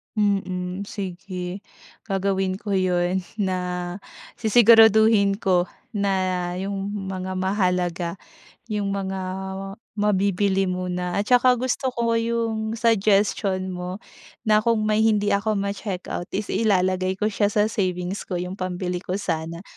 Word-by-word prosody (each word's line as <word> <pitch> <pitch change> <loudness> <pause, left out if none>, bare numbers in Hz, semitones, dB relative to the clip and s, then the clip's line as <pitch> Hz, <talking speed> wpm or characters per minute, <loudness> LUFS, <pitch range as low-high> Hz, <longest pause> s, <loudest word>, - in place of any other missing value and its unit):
Mm, 195 -2 -1
sige. 185 -1 -5 0.5
Gagawin 195 -1 0
ko 205 +1 -6
'yon, 185 -1 +1 0.2
na 180 -2 -2 0.4
sisiguraduhin 220 -2 +6
ko, 185 -4 +1 0.2
na 200 -3 0 0.4
'yong 195 +1 -3 0.2
mga 185 0 -4
mahalaga 180 -3 0 0.5
'yong 210 -3 -2
mga 195 -1 -3 0.7
mabibili 200 -1 +1
muna 180 -1 -2
at 205 +3 -1
tsaka 250 0 +6
gusto 255 +1 -1
ko 230 -1 +1
'yong 230 -1 -1
suggestion 200 -4 +2
mo, 180 +3 -5 0.4
na 215 -2 +4
kung 220 0 +1
may 215 0 +2
hindi 210 -2 +3
ako 215 +2 +1
ma-check 200 -1 -3
out 175 - -3
is 205 +1 -2
ilalagay 185 -3 +1
ko 210 +3 -1
siya 205 0 +1
sa 210 +1 +1
savings 185 -1 -2
ko 185 - -4
'yong 180 +2 -4
pambili 180 -1 -2
ko 180 0 -5
sana. 170 -3 -3
195 Hz, 125 wpm, -24 LUFS, 185-215 Hz, 0.7 s, sisiguraduhin